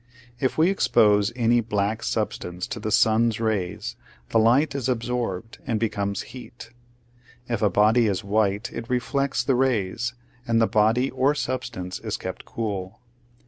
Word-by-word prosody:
If 130 -1 0
we 165 +4 +4
expose 105 - +3
any 120 -1 +3
black 105 -1 -1
substance 90 0 -3
to 125 -1 -6
the 110 - -3
sun's 110 +1 +3
rays, 105 -6 -2 0.3
the 115 - +3
light 125 +8 +4
is 135 -2 -2
absorbed 115 -4 -3
and 115 -4 0
becomes 100 -2 -1
heat. 115 -3 -11 0.8
If 115 -3 -2
a 105 - +4
body 110 +5 +4
is 100 0 -1
white 100 +1 0
it 115 0 -6
reflects 125 0 0
the 135 - +2
rays, 120 -2 0 0.3
and 115 -1 +3
the 115 - +5
body 110 +4 +2
or 130 +3 +2
substance 120 -10 -4
is - - -4
kept - - -7
cool. 105 -1 -4
115 Hz, 150 wpm, -24 LUFS, 105-125 Hz, 0.8 s, the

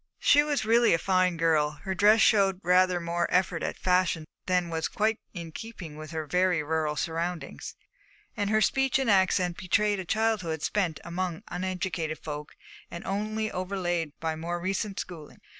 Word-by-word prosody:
She 290 - +5
was 290 -5 -1
really 230 -3 +5
a - - +1
fine 185 -1 +1
girl. 155 -2 +2
Her 190 -1 -2
dress 210 +4 +5
showed 195 -4 +4
rather 180 0 +4
more 170 0 -1
effort 180 -2 +1
at - - -3
fashion 180 -3 +1 0.2
than 180 -2 +1
was 160 -1 -1
quite 220 +1 0
in 170 -4 -7
keeping 185 -6 -8
with 155 0 -9
her 160 -1 -4
very 180 +1 +1
rural 155 0 -1
surroundings, 165 +2 -4 0.6
and 205 -3 -1
her 215 0 +3
speech 270 +4 +2
and 265 -5 +1
accent 185 -2 +2
betrayed 205 +2 +1
a 185 - -5
childhood 195 -7 0
spent 180 -7 0
among 175 -1 -4
uneducated 180 -3 -3
folk 150 -1 -7 0.3
and 170 - -8
only 215 +2 -2
overlaid 175 -4 -2
by 160 -1 -2
more 170 +2 -4
recent 195 +2 -2
schooling. 160 -5 -8
180 Hz, 165 wpm, -28 LUFS, 165-200 Hz, 0.6 s, She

